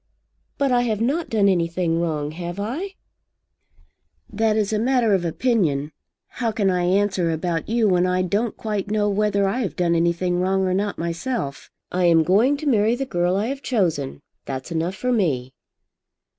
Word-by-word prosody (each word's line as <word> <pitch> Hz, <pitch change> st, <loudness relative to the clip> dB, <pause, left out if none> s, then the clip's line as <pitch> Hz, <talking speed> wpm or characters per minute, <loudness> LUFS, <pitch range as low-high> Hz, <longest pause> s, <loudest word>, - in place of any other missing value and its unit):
"But 280 Hz, -2 st, +1 dB
I 245 Hz, -1 st, +4 dB
have 220 Hz, -4 st, -1 dB
not 285 Hz, +9 st, 0 dB
done 210 Hz, -3 st, +3 dB
anything 170 Hz, -2 st, +1 dB
wrong. 155 Hz, -3 st, -2 dB
Have 175 Hz, +3 st, -6 dB
I?" 315 Hz, -, -4 dB, 1.4 s
"That 220 Hz, 0 st, +1 dB
is 215 Hz, 0 st, 0 dB
a 210 Hz, -, +1 dB
matter 240 Hz, -2 st, +2 dB
of 190 Hz, -3 st, +2 dB
opinion. 165 Hz, -, 0 dB, 0.4 s
How 235 Hz, -3 st, -2 dB
can 205 Hz, -3 st, +1 dB
I 180 Hz, -1 st, 0 dB
answer 190 Hz, -2 st, +1 dB
about 165 Hz, +1 st, -2 dB
you 230 Hz, -1 st, +2 dB
when 180 Hz, -2 st, +3 dB
I 185 Hz, 0 st, +1 dB
don't 205 Hz, +5 st, -1 dB
quite 210 Hz, -3 st, -3 dB
know 210 Hz, 0 st, +1 dB
whether 200 Hz, -1 st, +1 dB
I 210 Hz, +6 st, -1 dB
have 220 Hz, -7 st, -2 dB
done 175 Hz, -1 st, +1 dB
anything 170 Hz, +1 st, +1 dB
wrong 190 Hz, +1 st, +1 dB
or 185 Hz, -, 0 dB
not 200 Hz, +2 st, -1 dB
myself? 170 Hz, -, -4 dB, 0.2 s
I 180 Hz, 0 st, +1 dB
am 165 Hz, -2 st, +5 dB
going 220 Hz, -, +3 dB
to 305 Hz, -, -7 dB
marry 225 Hz, -3 st, +3 dB
the 270 Hz, +2 st, -3 dB
girl 175 Hz, -5 st, 0 dB
I 200 Hz, +2 st, 0 dB
have 275 Hz, 0 st, -4 dB
chosen. 165 Hz, -, -1 dB, 0.2 s
That's 130 Hz, +3 st, -5 dB
enough 165 Hz, +3 st, -1 dB
for 250 Hz, +6 st, -1 dB
me." 140 Hz, -, 0 dB
195 Hz, 180 wpm, -22 LUFS, 170-225 Hz, 1.4 s, am